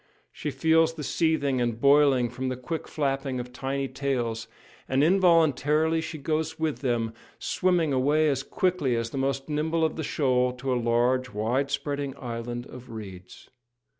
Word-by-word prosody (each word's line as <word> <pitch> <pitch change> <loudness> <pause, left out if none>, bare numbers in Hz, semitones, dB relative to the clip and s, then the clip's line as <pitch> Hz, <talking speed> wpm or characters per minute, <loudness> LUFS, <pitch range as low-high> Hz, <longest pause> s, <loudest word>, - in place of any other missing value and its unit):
She 150 - -4
feels 160 +4 +3
the 155 - -6
seething 145 -5 +1
and 120 -2 -1
boiling 140 -2 +5
from 130 +1 -3
the 130 - -3
quick 155 +6 -5
flapping 135 -3 -1
of 125 0 -7
tiny 135 +1 -2
tails; 120 -5 -2 0.4
and 135 +2 +3
involuntarily 160 -3 +3
she 160 0 -6
goes 160 +2 -2
with 160 -2 -1
them, 120 -4 -1 0.2
swimming 175 -5 +1
away 145 +4 +3
as 135 -3 +1
quickly 160 -4 0
as 115 0 -2
the 135 - -3
most 135 0 -1
nimble 160 +2 0
of 160 - -2
the 160 - -2
shoal, 125 -4 +1
to 130 +1 -2
a 120 -1 -1
large, 125 +2 +2
wide 120 +6 -1
spreading 140 -1 -3
island 120 -1 -5
of 125 -1 -11
reeds. 95 -5 -10
135 Hz, 165 wpm, -27 LUFS, 125-155 Hz, 0.4 s, boiling